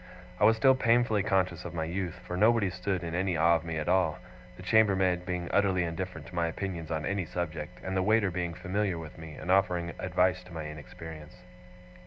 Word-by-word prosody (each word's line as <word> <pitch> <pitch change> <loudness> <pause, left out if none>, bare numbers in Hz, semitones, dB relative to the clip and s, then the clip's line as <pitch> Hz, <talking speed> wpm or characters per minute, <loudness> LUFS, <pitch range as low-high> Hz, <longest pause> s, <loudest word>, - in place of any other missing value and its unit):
I - - +5
was 110 +1 +5
still 130 +4 +6
painfully 115 -4 +3
conscious 95 -3 0
of 90 -1 -7
my 80 - -1
youth, 90 +2 -3
for 90 - -4
nobody 105 0 +3
stood 90 0 -2
in 85 -1 -4
any 90 -1 0
awe 85 +2 +5
of 80 - -9
me 80 -1 -4
at 75 - -3
all: 90 -4 +2 0.4
the - - -10
chambermaid 95 -5 +3
being 90 -2 -2
utterly 95 -3 +3
indifferent 90 +2 -4
to 95 - -13
my 85 -1 +1
opinions 85 -2 -4
on 80 -2 -2
any 100 -1 -1
subject, 85 0 -5
and 95 0 -3
the 95 - +2
waiter 105 0 +3
being 85 -1 -3
familiar 95 0 -1
with 80 -1 -9
me, 80 -1 -9
and 90 - -3
offering 90 -3 +2
advice 90 0 +1
to 90 - -13
my 80 -1 -4
inexperience. 75 +2 -10
90 Hz, 210 wpm, -29 LUFS, 85-95 Hz, 0.4 s, still